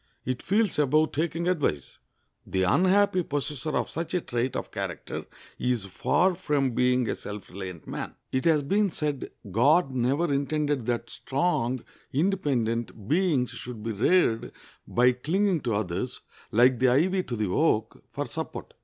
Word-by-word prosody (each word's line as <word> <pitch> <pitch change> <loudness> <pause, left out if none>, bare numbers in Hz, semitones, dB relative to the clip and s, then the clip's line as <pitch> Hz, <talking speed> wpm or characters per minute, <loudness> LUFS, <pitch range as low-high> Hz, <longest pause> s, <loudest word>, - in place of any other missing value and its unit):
It 130 0 -2
feels 205 -3 +1
above 155 +2 +3
taking 165 +2 -1
advice. 140 - -1 0.5
The 95 -1 0
unhappy 185 - +4
possessor 145 -1 -2
of - - -2
such 165 +2 -3
a 180 - +1
trait 120 -1 -2
of - - -4
character - - -5 0.3
is 125 -5 0
far 180 - +2
from 145 -6 0
being 125 0 +2
a - - -1
self 105 -1 -8
reliant 90 -3 -7
man. - - -5 0.2
It 130 0 -1
has 155 -3 +4
been 200 +8 +2
said 150 -5 -3 0.2
God 140 - +4
never 135 +6 +1
intended 145 -2 0
that 120 -1 -2
strong, 130 -5 -1 0.3
independent 125 - 0
beings 155 -6 +2
should 120 -3 -7
be 115 - -2
reared 115 - +2 0.4
by 125 +1 +4
clinging 175 +8 +1
to 115 -4 -1
others, 100 +5 -3 0.3
like 125 +2 +5
the 130 - +4
ivy 180 +9 +3
to 125 - -5
the 105 -3 -1
oak, 110 - +1
for - - -3
support. - - -6
135 Hz, 155 wpm, -27 LUFS, 120-165 Hz, 0.5 s, like